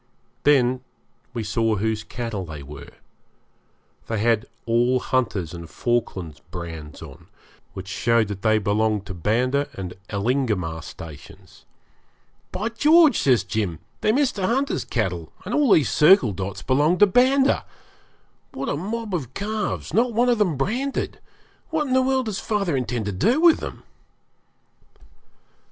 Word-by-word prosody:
Then 130 -3 +4 0.5
we 120 -3 -4
saw 110 +1 0
whose 110 +1 -1
cattle 115 -6 -5
they 75 -4 -8
were; 70 0 -10 1.2
they 115 - -2
had 110 0 +1 0.2
all 120 +2 +2
Hunter's 105 -11 -1
and 85 -1 -8
Falkland's 95 -10 -2
brands 80 -4 -8
on, - - -13 0.5
which 95 0 -8
showed 115 +3 +1
that 100 -1 -5
they 110 -1 +3
belonged 105 0 0
to 95 - -6
Banda 125 - 0
and 90 -2 -6 0.2
Elingamah 100 -7 -1
stations. 80 -1 -12 0.9
'By 215 +4 -2
George!' 305 +6 +5
says 125 -8 +3
Jim, 100 -4 -2 0.2
'they're 215 - +2
Mr. 260 -9 +1
Hunter's 260 +8 0
cattle, 90 - -2
and 205 - -4
all 290 -5 +3
these 150 -9 +4
circle 155 - +6
dots 95 +1 -5
belong 150 +7 +2
to 205 - +7
Banda. 260 +6 +3 0.9
What 135 - -4
a - - 0
mob 210 +6 -4
of 135 -8 -4
calves! 210 0 -3
not 235 +2 +2
one 240 +3 +3
of 240 -2 +2
them 180 -9 +1
branded! 245 - -2 0.5
What 315 -2 0
in 260 - -2
the 260 - +5
world 260 0 +1
does 210 -3 -3
father 200 -8 -1
intend 125 -4 -2
to 105 - -2
do 230 - +2
with 335 -1 +6
them?' - - -7
125 Hz, 145 wpm, -23 LUFS, -, 1.2 s, to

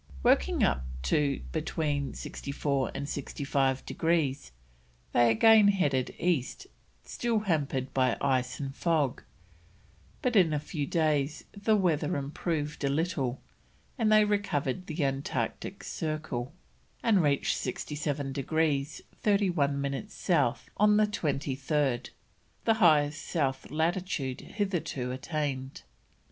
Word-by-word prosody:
Working - - +3
up 65 - +2 0.2
to 140 - +1
between 150 -3 -2
64 140 -1 -2
and 140 - -3
65 135 -2 -1
degrees, 155 - 0 0.6
they 120 -1 +5
again 215 - +6
headed 145 -11 +1
east 175 - -1 0.4
still 230 -3 -1
hampered 140 -9 -1
by 130 -3 +2
ice 130 -2 0
and 135 -2 -4
fog, 155 -7 +1 1.0
but 250 -2 +1
in 175 -6 +5
a 150 - +1
few 145 -1 -4
days 150 -2 0
the 215 +2 +1
weather 160 -7 +1
improved 150 +1 -3
a 140 - +2
little, 140 -4 -1 0.5
and 225 -4 +1
they 215 0 +6
recovered 185 -6 -1
the 155 -1 -2
Antarctic 135 0 -3
Circle, 155 -6 -3 0.5
and 215 -5 +4
reached 145 -3 +2
67 145 +1 -3
degrees 145 0 0 0.2
31 175 -9 +2
minutes 140 +9 -4
South 145 -9 +1
on 210 0 +5
the 215 - +5
23rd, 140 - -1 0.6
the 225 - +5
highest 155 -7 +4
south 135 -5 -1
latitude 160 -4 -1
hitherto 175 - -2
attained. 135 -1 -3
150 Hz, 115 wpm, -29 LUFS, 135-175 Hz, 1.0 s, again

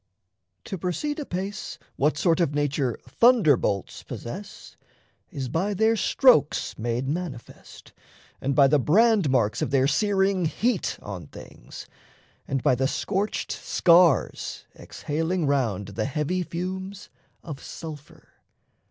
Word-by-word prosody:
To 190 - -6
proceed 290 - -2
apace, 200 -6 -5 0.2
What 150 +2 +1
sort 170 +1 +2
of 150 -5 +1
nature 145 -4 0
thunderbolts 155 - +2
possess 190 - -9 0.5
Is 140 -8 -5
by 190 +10 -1
their 220 +3 +3
strokes 240 - +3
made 120 +3 -2
manifest 150 -5 -7 0.5
and 135 0 -1
by 140 - +6
The 145 +2 +4
brand 200 - +3
marks 115 -5 +1
of - - 0
their 135 -1 +3
searing 195 +2 +1
heat 215 +6 -1
on 95 -7 -7
things, - - -12 0.6
And 135 -2 -2
by - - +4
the 130 +2 +1
scorched 200 +7 -2
scars 170 -5 +2
exhaling 165 +3 -3
round 115 -9 0
The 110 +2 -3
heavy 150 +6 -1
fumes 190 +3 -6 0.3
of 150 -5 -8
sulphur. 150 -3 -10
160 Hz, 120 wpm, -25 LUFS, 135-190 Hz, 0.6 s, by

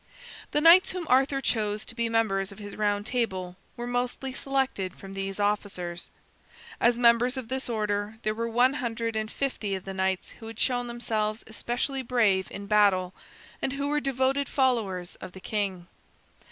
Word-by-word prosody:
The 295 - +1
knights 340 +4 +7
whom 365 -2 -4
Arthur 270 +1 +4
chose 215 -4 0
to - - -6
be 230 -1 -1
members 200 -4 +1
of 200 - -12
his 205 -1 -8
Round 205 -1 0
Table 190 -7 -2 0.2
were 240 - -4
mostly 245 +2 -2
selected 265 -9 -1
from 195 0 -10
these 195 0 -4
officers. 195 -4 -1 0.7
As 240 0 +4
members 240 +2 +4
of 245 -3 -5
this 260 -1 -2
order 210 -1 -1
there 215 - +1
were 230 +1 -2
one 245 +3 +3
hundred 230 -4 -2
and 215 0 -1
fifty 220 -8 -2
of 190 - -7
the 195 - -5
knights 190 0 -1
who 225 - -9
had 225 -1 -8
shown 245 -2 +1
themselves 220 -2 -2
especially 240 +4 -2
brave 220 -7 +2
in 200 - -7
battle 200 -3 +3 0.5
and 265 - -1
who 280 +1 -2
were 295 0 +2
devoted 270 +1 +1
followers 220 -10 0
of 180 - -9
the 190 - -10
king. 195 -3 -2
225 Hz, 175 wpm, -27 LUFS, 200-250 Hz, 0.7 s, knights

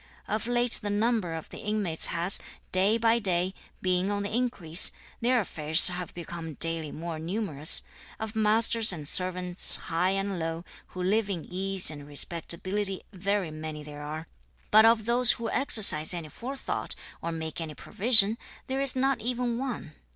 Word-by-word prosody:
Of 215 +2 -4
late 245 0 -1
the 205 - -5
number 205 -4 -1
of 160 - -9
the - - -11
inmates 205 -6 +3
has, 170 +3 +1 0.3
day 195 +4 +2
by 230 0 +1
day, 185 -3 +2 0.3
been 185 +1 -1
on 205 0 -3
the 205 - -5
increase; 200 -9 +3 0.3
their 245 +1 +1
affairs 160 -4 +3
have 180 -1 -7
become 165 -2 -8
daily 165 -1 0
more 165 0 -7
numerous; 165 -4 0 0.4
of 220 0 -7
masters 220 +1 +3
and 155 -5 -6
servants, 180 +1 +6
high 170 +2 -1
and 195 -1 -3
low, 165 +1 -5 0.2
who 185 - -8
live 205 +3 0
in 175 -5 -5
ease 190 -1 +2
and 145 -2 -11
respectability 185 +6 -3
very 195 -2 -3
many 155 -1 -8
there 145 0 -11
are; 155 +2 -8 0.4
but 215 +1 +6
of 225 -1 +2
those 240 +1 +5
who 230 -1 -6
exercise 195 - +4
any 165 -3 -7
forethought, 265 - -6 0.3
or 170 - -5
make 160 0 -6
any 155 -2 -7
provision, 215 - +3 0.3
there 265 +1 -4
is 275 -2 -1
not 270 0 -1
even 245 0 -3
one. 245 - -6
190 Hz, 165 wpm, -26 LUFS, 165-220 Hz, 0.4 s, servants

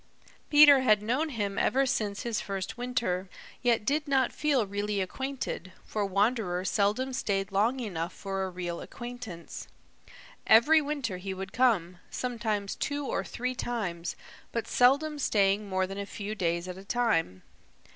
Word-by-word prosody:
Peter 290 -2 +8
had 215 -5 +4
known 260 +9 0
him 205 -7 -2
ever 270 +1 +2
since 210 -5 -1
his 235 -2 -1
first 195 -1 -4
winter, 230 -7 -2 0.3
yet 235 -3 +2
did 295 +4 0
not 265 -3 +2
feel 280 -7 +1
really 205 +1 -2
acquainted, 220 -3 -4
for 210 - -2
Wanderer 200 -2 0
seldom 215 +7 +1
stayed 195 -5 -1
long 220 +7 +2
enough 175 -8 -3
for 195 -1 -4
a 190 - -2
real 175 -1 -5
acquaintance. 240 -8 -8 0.8
Every 300 +9 +7
winter 280 -10 -3
he 190 +1 -5
would 190 +1 -7
come, 185 -9 +2
sometimes 220 -5 -2
two 285 -1 -2
or - - -1
three 250 +1 -3
times, 195 -9 -3 0.4
but 230 - -3
seldom 285 +5 +3
staying 200 -4 +2
more 190 0 +1
than 195 +1 -6
a 200 - -4
few 205 +1 -5
days 170 -3 -1
at 180 0 -6
a - - -11
time. 195 - 0
210 Hz, 155 wpm, -29 LUFS, 190-250 Hz, 0.8 s, Peter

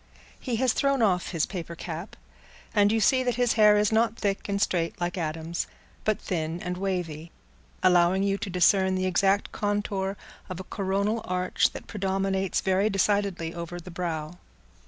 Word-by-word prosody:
He 250 -3 -2
has 250 +1 +2
thrown 275 -3 +2
off 180 -4 +2
his 165 -4 0
paper 170 -3 -6
cap, 165 +3 -6 0.6
and 205 -1 +4
you 225 - +2
see 255 +5 +4
that 245 -2 0
his 245 -1 +2
hair 210 -1 +6
is 210 0 +2
not 225 0 +2
thick 200 -1 -2
and 200 0 0
straight, 175 -5 0
like 175 +1 -2
Adam's, 165 0 -3 0.4
but 215 -1 +1
thin 165 -1 -3
and 180 0 -3
wavy, 175 -4 -3 0.5
allowing 180 +1 +4
you 200 0 0
to - - -4
discern 190 +1 +3
the 185 0 0
exact 195 +2 +2
contour 205 -1 -1 0.3
of 185 -1 -5
a - - -5
coronal 200 +4 -1
arch 180 0 +1
that - - -8
predominates 195 -1 -1
very 190 +2 +2
decidedly 195 -4 0
over 170 +1 -6
the 180 +1 -10
brow. 165 -1 -4
190 Hz, 170 wpm, -27 LUFS, 175-205 Hz, 0.6 s, hair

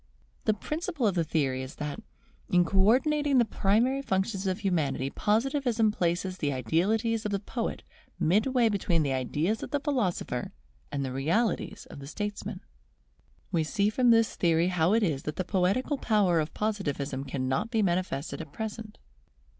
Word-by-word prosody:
The 215 - +3
principle 305 - -3
of 205 - +3
the 170 -2 +1
theory 140 -5 0
is 130 +1 -7
that, 150 -1 -4 0.5
in 180 -1 +4
co 190 +3 +1
ordinating 280 +7 +3
the 240 - +5
primary 230 +7 +2
functions 195 -3 -1
of 190 +3 -1
humanity, 150 -8 0
Positivism 230 0 +1
places 185 0 -1
the 145 -2 0
Idealities 210 - +1
of 210 - -2
the 200 - 0
poet 225 +3 -4 0.4
midway 230 +8 +3
between 180 -6 +1
the 140 -2 0
Ideas 150 - -1
of - - -5
the 290 - 0
philosopher 200 - -1 0.4
and 140 -1 -2
the 130 - -4
Realities 170 - 0
of - - -9
the 135 - -9
statesman. 205 +6 -5 0.9
We 165 -2 +2
see 200 +6 +1
from 245 +2 +3
this 230 -1 +4
theory 170 0 +2
how 180 +1 +2
it 230 - +3
is 150 -8 0
that 150 - -4
the 185 - -1
poetical 200 - +1
power 200 -7 +3
of 155 -1 -3
Positivism 145 -11 -2
cannot 135 - -1
be 225 -3 +1
manifested 175 -5 -1
at 155 -3 -9
present. 220 +2 -6
195 Hz, 165 wpm, -28 LUFS, 155-225 Hz, 0.9 s, the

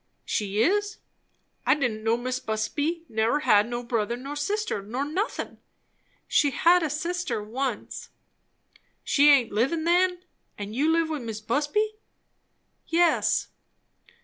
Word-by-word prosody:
"She 205 +1 0
is! 410 +3 +1 0.7
I - - +4
didn't 240 -7 -2
know 225 +1 +2
Mis' 255 +1 -3
Busby 290 +11 -2
never 225 +6 +1
had 210 -6 +4
no 240 0 -4
brother, 235 -1 -1
nor 275 +4 -7
sister', 400 - -2
nor 240 +8 -3
nothin'." 370 +10 -3 0.7
"She 290 - +3
had 345 +6 +4
a 315 - -1
sister 310 -6 -2
once." 245 +2 -4 0.9
"She 290 +1 +4
aint 270 -5 +5
livin' 270 +10 0
then. 360 +1 +2 0.3
And 205 +1 -6
you 295 +5 +2
live 330 -1 +2
with 300 -3 -3
Mis' 225 -2 -5
Busby?" 295 - -1 0.9
"Yes." 340 0 +2
280 Hz, 130 wpm, -26 LUFS, 225-335 Hz, 0.9 s, aint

